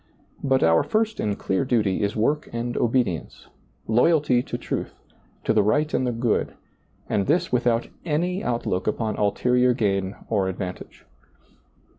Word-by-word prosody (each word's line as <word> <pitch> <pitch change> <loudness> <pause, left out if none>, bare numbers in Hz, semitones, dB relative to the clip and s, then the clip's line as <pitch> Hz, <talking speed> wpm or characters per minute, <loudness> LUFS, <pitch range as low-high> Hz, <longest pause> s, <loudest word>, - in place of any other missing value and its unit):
But 135 -1 +2
our 80 0 +5
first 220 0 0
and 105 -1 -1
clear 95 - 0
duty 110 -7 +1
is 100 0 -1
work 145 +8 0
and 120 +1 -3
obedience, 115 -8 -1 0.4
loyalty 125 +2 +3
to - - -5
truth, - - -4 0.5
to - - +1
the 110 - +4
right 150 +9 +1
and 130 - +1
the - - +1
good, 115 -1 -1 0.5
and 100 - 0
this 170 +5 +1
without 120 -1 +1 0.2
any 175 +4 -1
outlook 115 -6 -1
upon 110 0 -1
ulterior 125 +4 +2
gain 100 -4 0
or 100 -4 +1
advantage. 95 -1 -7
120 Hz, 145 wpm, -24 LUFS, 100-130 Hz, 0.5 s, our